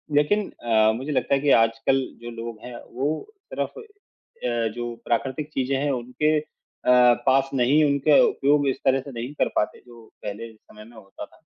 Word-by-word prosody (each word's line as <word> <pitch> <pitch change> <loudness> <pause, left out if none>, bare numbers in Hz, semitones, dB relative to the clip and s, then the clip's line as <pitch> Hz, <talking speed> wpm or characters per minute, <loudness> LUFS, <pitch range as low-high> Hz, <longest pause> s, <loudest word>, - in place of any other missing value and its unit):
लेकिन 195 +8 +2
अ, 110 -2 +4
मुझे 135 +6 -5
लगता 140 - 0
है 135 - +3
कि 145 - +1
आजकल 115 +4 +3 0.2
जो 120 - -7
लोग 115 -1 -7
हैं 125 -1 -8 0.2
वो 130 +4 -1 0.5
सिर्फ़ - - -4
अ, 400 - -6
जो 120 -1 -5
प्राकृतिक 135 +5 -2
चीज़ें 135 +1 -1
हैं 145 +1 0
उनके 130 +5 0
अ, - - -9 0.8
पास 135 0 +3
नहीं 135 +4 +3
उनके 140 +1 +4
उपयोग 145 +1 +2
इस 130 - -2
तरह 135 0 +4
से 140 - -10
नहीं 120 +3 -6
कर - - +3
पाते 105 - -1
जो 120 -2 -15 0.2
पहले 110 +2 -6
समय 105 0 -16
में 115 +1 -17
होता 100 -2 -10
था। - - -24
130 Hz, 180 wpm, -24 LUFS, 115-145 Hz, 0.8 s, अ